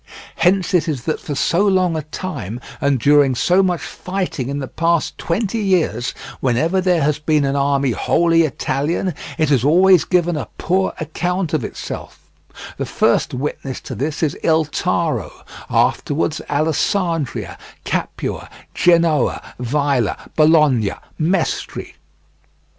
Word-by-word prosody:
Hence 185 0 +2
it 175 -2 +3
is 140 -7 -2
that 155 - -2
for 145 - -5
so 170 +7 +2
long 185 -4 +2
a 155 - -1
time, 140 - -6 0.2
and 140 -2 +2
during 140 +1 +4
so 180 +9 +3
much 180 -3 0
fighting 180 -9 -4
in 140 - -2
the 135 -2 -4
past 165 +2 0
twenty 210 +5 -1
years, 175 - 0 0.2
whenever 160 +9 +1
there 180 -4 +2
has 150 +1 +1
been 150 -1 +1
an 135 0 0
army 140 -1 +1
wholly 165 +7 +2
Italian, 155 +4 -1 0.2
it 155 -3 +1
has 135 -5 +3
always 180 +4 +5
given 175 -2 +1
a 145 - -4
poor 190 +2 0
account 175 +2 -2
of 155 -6 +1
itself; - - -7 0.6
the - - -2
first - - +1
witness 135 0 -4
to - - -7
this 150 +4 -3
is 155 -2 +1
Il 160 -1 +3
Taro, 150 - -2 0.2
afterwards 155 +1 0
Allesandria, 155 - -1 0.3
Capua, - - -3 0.2
Genoa, 170 -5 +2
Vaila, 135 -2 0 0.2
Bologna, 150 -9 +4 0.3
Mestri. 170 +2 -1
155 Hz, 135 wpm, -19 LUFS, 140-175 Hz, 0.6 s, always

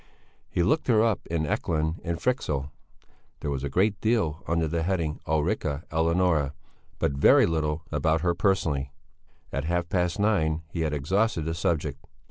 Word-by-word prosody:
He 85 - +1
looked 155 - +1
her 110 -3 +4
up 115 -4 0
in 80 -2 -1
Ekelund 80 +2 -1
and 85 -1 -2
Fryxell. 75 - -1 0.7
There 70 - -2
was 70 -1 -3
a 70 - -2
great 100 +7 +1
deal 105 -9 +1
under 85 -1 +1
the 85 +1 -1
heading 85 -3 -1
Ulrica 75 -1 0
Eleonora, 80 -2 +2 0.4
but - - +1
very 70 0 +5
little 80 -1 -1
about 80 +1 +1
her 90 -1 +2
personally. 80 -8 0 0.6
At 70 +1 -2
half 85 +1 -1
past 90 -2 0
nine 80 -7 +1
he 85 - -3
had 80 -2 0
exhausted 90 +4 0
the 80 - -1
subject. 75 -4 -1
80 Hz, 160 wpm, -27 LUFS, 75-90 Hz, 0.7 s, very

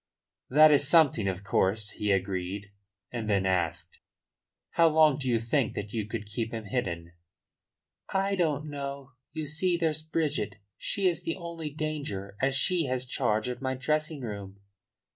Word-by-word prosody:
"That 155 +3 +7
is 145 -1 +5
something, 145 - +5
of 95 0 -2
course," 105 +2 +1
he 105 -1 -1
agreed. 95 +1 -2 0.4
And 115 -3 -3
then 100 -2 +2
asked: 90 -3 -1 0.7
"How 170 -1 +5
long 155 -3 +5
do 130 -2 -2
you 115 -2 +3
think 115 +1 0
that 105 0 -5
you 110 -3 -2
could 110 -1 -4
keep 110 +2 -3
him 115 -1 -4
hidden?" 90 -7 -3 1.0
"I 195 +1 +1
don't 155 -5 0
know. 140 -2 -6 0.2
You 155 -1 -3
see, 170 +4 +1
there's 160 -2 0
Bridget. 150 -10 -1 0.2
She 200 - -2
is 175 -2 0
the 165 - -2
only 170 -3 -5
danger, 145 -11 -4
as 130 0 +2
she 170 +3 +2
has 130 -1 -1
charge 120 -3 0
of 125 0 -4
my 130 0 -1
dressing 155 +2 -1
room." 100 -4 -6
130 Hz, 160 wpm, -29 LUFS, 105-155 Hz, 1.0 s, That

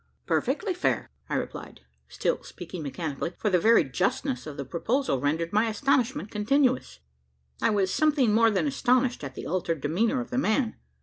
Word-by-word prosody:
"Perfectly 425 -5 0
fair," 355 - -1 0.2
I - - -1
replied, - - -5 0.3
still - - -1
speaking 180 - -8
mechanically 155 +2 -4
for 210 - 0
the 180 - +4
very 225 +1 +5
justness 125 -1 -1
of 150 - -7
the 140 - -4
proposal 220 - 0
rendered 160 +5 -1
my 215 +2 +3
astonishment 245 -1 0
continuous. 255 +5 +1 0.6
I 230 - +3
was 200 -3 +1
something 290 -8 +3
more 225 +1 +5
than 210 +6 +1
astonished 255 - +1
at 135 -2 -6
the - - -7
altered 170 -2 -1
demeanour 215 - +1
of 245 0 -6
the 255 - +1
man. 220 -1 +1
215 Hz, 170 wpm, -27 LUFS, 165-255 Hz, 0.6 s, very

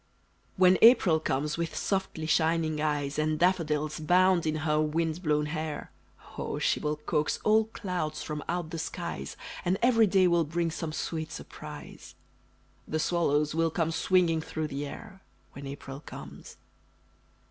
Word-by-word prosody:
When 185 0 +5
April 225 -9 +7
comes 150 +1 -1
with 165 -2 -2
softly 180 -1 -2
shining 160 -1 +1
eyes, 145 -1 -1
And 155 0 +1
daffodils 155 -4 +1
bound 180 +1 +3
in 155 - 0
her 150 -1 +2
wind 160 +2 -1
blown 150 -3 +1
hair, 155 -1 -4 0.5
Oh, - - -3
she - - +1
will 150 0 -1
coax 150 0 -1
all 220 +1 +4
clouds 180 -8 -4
from 150 -1 -5
out 175 -2 -2
the 165 - -4
skies, 70 - -5 0.3
And 180 +2 +1
every 230 -3 +5
day 190 -1 +4
will 170 -1 +3
bring 170 +2 -1
some 160 0 -4
sweet 160 0 -4
surprise, - - -10 0.7
The 155 - -1
swallows 150 -2 +1
will 165 0 +2
come 165 0 -1
swinging 165 0 +2
through 155 -1 -4
the 145 0 -4
air 195 +6 -10 0.3
When 140 0 -9
April 135 0 -7
comes! 70 - -11
160 Hz, 150 wpm, -29 LUFS, 150-175 Hz, 0.7 s, April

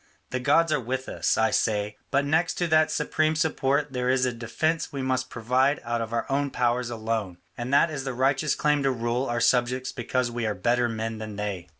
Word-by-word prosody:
The 130 - -1
gods 155 +5 +3
are - - +2
with 130 +2 -4
us, - - 0
I 110 0 +3
say; 105 -1 0
but 140 +1 +1
next 160 +4 +1
to 175 - 0
that 155 -1 +3
supreme 155 +1 0
support 145 -2 0
there 125 0 -1
is 130 0 +3
a 125 - -1
defence 140 +8 -1
we 140 -3 -4
must 130 -1 -1
provide 130 +5 +1
out 120 0 -2
of 115 -1 -4
our 115 0 -1
own 140 +1 0
powers 120 -1 0
alone; 110 -5 -3 0.2
and 120 +2 -5
that 145 +4 +4
is 140 -3 -4
the 130 -2 -4
righteous 135 +3 +1
claim 150 -1 +2
to 135 - +2
rule 120 +1 -1
our 120 0 -1
subjects 125 +2 +1
because 125 -1 -1
we 120 -1 -2
are 105 - -1
better 120 0 +1
men 110 0 -4
than 110 -1 -6
they. 100 -4 -4
125 Hz, 220 wpm, -26 LUFS, 115-140 Hz, 0.2 s, that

